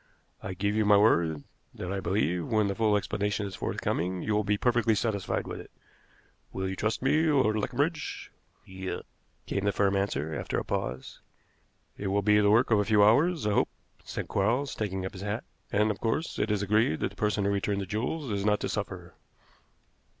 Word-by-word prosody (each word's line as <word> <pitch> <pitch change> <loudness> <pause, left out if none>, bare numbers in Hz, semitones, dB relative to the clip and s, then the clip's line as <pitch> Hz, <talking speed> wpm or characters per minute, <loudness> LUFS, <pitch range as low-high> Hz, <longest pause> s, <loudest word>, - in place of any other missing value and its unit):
I 95 - -5
give 100 +3 0
you 110 0 +2
my 105 0 +6
word 85 -8 +3 0.3
that 90 - -5
I 100 - -2
believe, 90 -2 0
when 110 -2 +2
the 100 - -1
full 105 0 +2
explanation 105 0 -1
is 100 - -6
forthcoming, 90 +2 -2
you 110 - 0
will 105 0 +2
be 105 0 +1
perfectly 120 -1 +2
satisfied 100 -4 -1
with - - -6
it. - - -11 0.8
Will 95 0 -3
you 95 - -3
trust 110 +5 -1
me, 150 +4 +3
Lord 130 -8 +3
Leconbridge?" 145 +9 -2 0.3
"Yes," 95 0 -5 0.4
came 100 - -2
the 100 - +3
firm 100 -1 +1
answer, 80 -6 -1
after - - -3
a - - -2
pause. 65 +1 -4 0.8
"It 100 - -3
will 100 +1 +1
be 105 +1 +5
the 100 -1 +4
work 115 +4 +4
of 110 - +5
a 105 - +1
few 105 -1 +4
hours, 150 +8 +4
I 105 - +2
hope," - - +2 0.3
said - - -5
Quarles, 120 +8 0
taking 95 -3 -3
up 95 - -5
his 95 - -8
hat; 105 +3 -3 0.3
"and, 105 +1 +3
of 100 - -6
course, 115 +9 -1
it 110 - 0
is 105 -1 0
agreed 105 -5 +2
that - - 0
the - - -16
person 105 -1 0
who 100 - +2
returned 100 0 0
the - - -3
jewels 125 - -3
is 100 -1 -1
not 105 0 +2
to - - -2
suffer." - - -5
105 Hz, 205 wpm, -28 LUFS, 95-110 Hz, 0.8 s, my